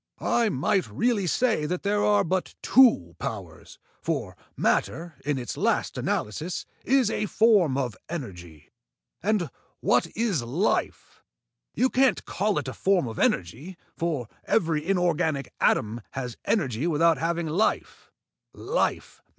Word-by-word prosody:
I 235 -2 +2
might 190 +5 +1
really 225 -5 0
say 220 -6 +1
that 180 +3 -3
there 205 0 +1
are 205 -1 +4
but 185 +2 -2
two 225 - +5
powers, - - -7 0.2
for - - -3 0.2
matter, 170 0 0
in 145 -1 -1
its 125 -2 -5
last - - 0
analysis, 155 - -2 0.2
is 260 -4 +3
a 210 - -1
form 200 - +4
of 125 -7 -2
energy. 90 - -8 0.5
And 195 - 0 0.3
what - - +2
is 215 - +1
life? 140 - -2 0.5
You 260 +1 +2
can't 265 0 +2
call 205 +1 0
it - - -2
a - - -4
form 190 -8 +1
of 110 - -6
energy, 135 - -1 0.2
for 160 -9 -2 0.2
every 160 -7 +1
inorganic 170 -5 0
atom 110 +3 +1
has 125 -3 -4
energy 140 - 0
without 165 0 +3
having 170 +1 -1
life. 170 +8 0
170 Hz, 130 wpm, -26 LUFS, 135-205 Hz, 0.5 s, two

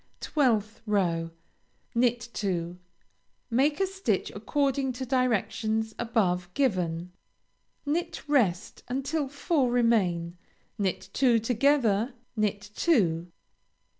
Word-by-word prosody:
12th 225 -7 +1
row 170 -5 +1 0.6
Knit 240 -1 +1
two; 180 -3 -2 0.7
make 280 +7 +2
a 390 - +3
stitch 385 +1 -1
according 275 -2 0
to 255 +1 -5
directions 220 -3 0
above 185 -7 0
given; 180 -9 0 0.7
knit 305 +1 -2
rest 220 -10 +1
until 275 +4 -1
four 285 -1 0
remain; 185 -8 +1 0.4
knit 190 -3 -1
two 245 -4 +4
together; 240 -1 +2 0.2
knit 205 -1 -1
two. 180 - +2
230 Hz, 95 wpm, -28 LUFS, 190-270 Hz, 0.7 s, two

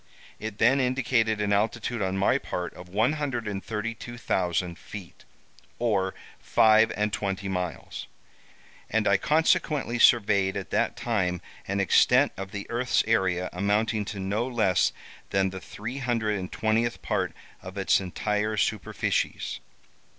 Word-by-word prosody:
It 110 -1 -5
then 125 +5 +4
indicated 125 -4 +1
an 105 -1 +1
altitude 115 +3 0
on 95 0 -1
my 95 - +3
part 90 -1 -4
of 90 0 -12
132,000 110 - -2
feet, 100 -5 -10 0.5
or 100 -6 0 0.2
five 110 0 +5
and 105 0 0
twenty 100 0 -2
miles, 90 -6 -4 0.8
and 110 0 +1
I 100 - +5
consequently 150 -3 +1
surveyed 100 -5 +4
at - - -6
that - - +1
time 90 -7 0 0.3
an 100 +1 -1
extent 100 - +4
of 95 0 -6
the 100 0 -6
earth's 120 +1 +2
area 95 -5 +1
amounting 105 +3 +1
to 100 0 -6
no 100 +5 -1
less 110 -7 +2 0.4
than 95 -1 +1
the 95 0 -7
three 115 +6 -6
hundred 115 -5 0
and 90 -1 -6
twentieth 115 +2 0
part - - -1 0.3
of 95 +2 -9
its 95 0 +3
entire 105 +3 -1
superficies. 105 -4 -1
105 Hz, 130 wpm, -27 LUFS, 95-115 Hz, 0.8 s, five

